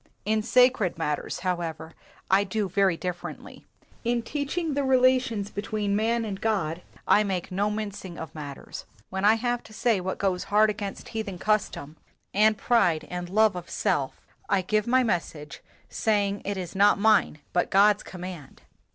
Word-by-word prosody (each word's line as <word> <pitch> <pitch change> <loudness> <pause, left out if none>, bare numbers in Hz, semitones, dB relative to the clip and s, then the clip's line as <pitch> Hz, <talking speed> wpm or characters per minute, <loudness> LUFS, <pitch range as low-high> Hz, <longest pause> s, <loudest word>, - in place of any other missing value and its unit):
In 215 +1 +1
sacred 250 -6 +3
matters, 150 -3 -3
however, 165 -3 -3 0.4
I 195 +1 +5
do 200 +1 -2
very 190 -2 +2
differently. 180 -1 -7 0.4
In 235 -1 0
teaching 300 +5 -2
the 285 0 0
relations 255 -5 +2
between 205 0 -2
man 230 +2 +1
and 195 -3 -5
God 180 -7 -1 0.3
I 210 - +5
make 190 -4 -3
no 200 +3 0
mincing 205 -4 -5
of 160 - -7
matters. 145 -3 -8 0.3
When 190 +1 -1
I 215 +2 +6
have 240 +1 -1
to 220 - -15
say 215 -3 +1
what 190 +1 -3
goes 185 -2 -1
hard 210 +1 +4
against 205 -1 -6
heathen 215 -5 -4
custom 180 -7 -1 0.4
and 215 +1 +4
pride 180 -9 +2
and 180 0 -4
love 215 +1 +3
of 180 -1 -7
self, - - -1 0.3
I 190 - +2
give 215 +3 0
my 255 +1 +4
message, 155 - -3 0.3
saying 205 -2 0
it 200 0 -2
is 180 0 -6
not 200 +1 +5
mine 210 -6 +3 0.2
but 175 - +1
God's 205 +1 +5
command." 180 -6 -9
200 Hz, 160 wpm, -26 LUFS, 180-220 Hz, 0.4 s, I